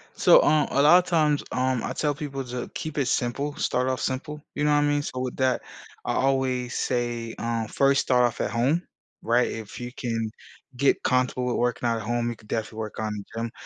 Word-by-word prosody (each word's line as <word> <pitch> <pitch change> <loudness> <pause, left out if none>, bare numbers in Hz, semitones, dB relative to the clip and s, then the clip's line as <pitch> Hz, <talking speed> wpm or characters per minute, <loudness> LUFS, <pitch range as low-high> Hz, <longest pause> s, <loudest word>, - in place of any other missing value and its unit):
So, - - +7
um, 155 -1 +3
a 140 - +3
lotta 175 +5 +6
times, 150 -4 +2
um, 130 -1 0
I - - -3
tell 150 -1 0
people 140 -2 -5
ju 125 0 -5
"Keep 155 -2 -5
it 140 -3 +1
simple. 140 +5 -1
Start 125 +1 0
off 130 - -2
simple." 150 +3 -3
You 145 - -1
know 150 - +3
what 145 - +4
I - - +3
mean? 145 0 +2
So 130 -3 -5
with 130 -1 -3
that, 130 -1 +1 0.4
I - - 0
always 130 -2 +1
say, 120 -2 -2
um, 115 -1 -1
first, 140 +3 +3
start 125 -1 +3
off 120 - -2
at - - 0
home, 130 +9 +2 0.4
right, 120 +2 +2
if 110 0 -7
you 120 0 -6
can 115 -3 -2 0.5
get 140 +3 +2
comfortable 125 0 +1
with 125 - 0
working 120 0 0
out 115 - +1
at 110 - -5
home, 120 +2 -1
you 120 - -4
could 105 - -20
definitely 110 0 -3
work 110 -1 -5
on 110 -1 -2
the 100 -1 -6 0.2
gym. 115 -1 -3
125 Hz, 225 wpm, -25 LUFS, 120-140 Hz, 0.5 s, So